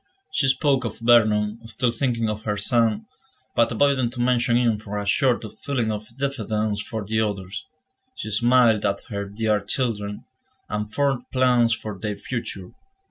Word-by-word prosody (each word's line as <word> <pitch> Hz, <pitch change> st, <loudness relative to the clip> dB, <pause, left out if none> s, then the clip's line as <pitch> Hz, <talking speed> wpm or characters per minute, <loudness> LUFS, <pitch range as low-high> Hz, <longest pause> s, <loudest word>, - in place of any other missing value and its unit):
She 135 Hz, -, +2 dB
spoke 135 Hz, 0 st, +2 dB
of 115 Hz, -3 st, -4 dB
Vernon, 110 Hz, -2 st, +3 dB
still 115 Hz, +2 st, 0 dB
thinking 115 Hz, -2 st, 0 dB
of 105 Hz, 0 st, -3 dB
her 105 Hz, -1 st, -2 dB
son, 115 Hz, -, +1 dB, 0.5 s
but 115 Hz, -, +3 dB
avoiding 130 Hz, 0 st, +2 dB
to 120 Hz, +1 st, -9 dB
mention 120 Hz, -1 st, +2 dB
him 115 Hz, -3 st, +2 dB
from 105 Hz, -1 st, -5 dB
a 100 Hz, -, -4 dB
sort 125 Hz, +4 st, +2 dB
of 110 Hz, -1 st, -10 dB
feeling 120 Hz, -6 st, -1 dB
of 105 Hz, 0 st, -5 dB
diffidence 110 Hz, -6 st, -1 dB
for 110 Hz, 0 st, -5 dB
the 110 Hz, +2 st, 0 dB
others; 100 Hz, -1 st, -3 dB, 0.5 s
she 110 Hz, -, -5 dB
smiled 120 Hz, 0 st, +4 dB
at 100 Hz, -1 st, 0 dB
her 100 Hz, -2 st, -3 dB
dear 105 Hz, 0 st, +1 dB
children, 105 Hz, -2 st, -2 dB, 0.4 s
and 105 Hz, 0 st, -3 dB
formed 135 Hz, 0 st, 0 dB
plans 125 Hz, -3 st, +3 dB
for 105 Hz, -4 st, -7 dB
their 105 Hz, +1 st, -3 dB
future. 100 Hz, -7 st, -5 dB
110 Hz, 165 wpm, -24 LUFS, 105-125 Hz, 0.5 s, smiled